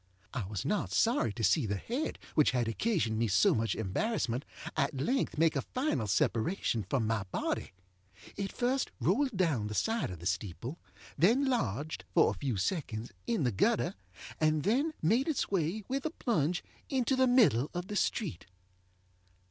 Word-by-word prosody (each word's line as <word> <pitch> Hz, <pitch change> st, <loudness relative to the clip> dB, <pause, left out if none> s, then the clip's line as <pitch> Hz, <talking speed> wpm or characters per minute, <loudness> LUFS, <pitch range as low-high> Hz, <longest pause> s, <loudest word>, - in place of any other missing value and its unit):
I 115 Hz, -6 st, -2 dB
was 105 Hz, +4 st, -4 dB
not 205 Hz, +8 st, 0 dB
sorry 230 Hz, -, +2 dB
to 115 Hz, -, -5 dB
see 110 Hz, -, +3 dB
the 100 Hz, -, -1 dB
head 245 Hz, -, -3 dB, 0.2 s
which 150 Hz, -, +4 dB
had 125 Hz, -2 st, 0 dB
occasioned 115 Hz, -, 0 dB
me 115 Hz, -, +2 dB
so 95 Hz, -1 st, +4 dB
much 115 Hz, 0 st, 0 dB
embarrassment 125 Hz, -, -1 dB, 0.3 s
at 140 Hz, -2 st, 0 dB
length 250 Hz, -, 0 dB
make 160 Hz, 0 st, +3 dB
a 140 Hz, -, +1 dB
final 250 Hz, -, -1 dB
separation 115 Hz, -, +1 dB
from 125 Hz, -2 st, +1 dB
my 110 Hz, -1 st, 0 dB
body. -, -, -2 dB, 0.6 s
It 200 Hz, -1 st, -3 dB
first 255 Hz, +2 st, 0 dB
rolled 245 Hz, -, +1 dB
down 150 Hz, -, +1 dB
the 105 Hz, -, -5 dB
side 225 Hz, -, 0 dB
of 90 Hz, -, -6 dB
the 85 Hz, -, -11 dB
steeple, 100 Hz, -, -3 dB, 0.4 s
then 235 Hz, -, +4 dB
lodge, 155 Hz, -, -1 dB, 0.2 s
for 165 Hz, -, +5 dB
a -, -, -8 dB
few 130 Hz, -7 st, -1 dB
seconds, 115 Hz, -, -2 dB, 0.2 s
in 230 Hz, -9 st, +1 dB
the 125 Hz, -, +2 dB
gutter, 95 Hz, -, +1 dB, 0.5 s
and 155 Hz, -1 st, +2 dB
then 280 Hz, +10 st, +1 dB
made 230 Hz, -, +3 dB
its 310 Hz, -10 st, -1 dB
way, 190 Hz, +3 st, 0 dB
with 270 Hz, +1 st, -2 dB
a 315 Hz, -, 0 dB
plunge, 180 Hz, -, 0 dB, 0.3 s
into 265 Hz, -1 st, +1 dB
the 260 Hz, 0 st, +4 dB
middle 205 Hz, -, +4 dB
of 175 Hz, 0 st, -2 dB
the 205 Hz, -, -6 dB
street. 195 Hz, -, -1 dB
155 Hz, 170 wpm, -31 LUFS, -, 0.6 s, for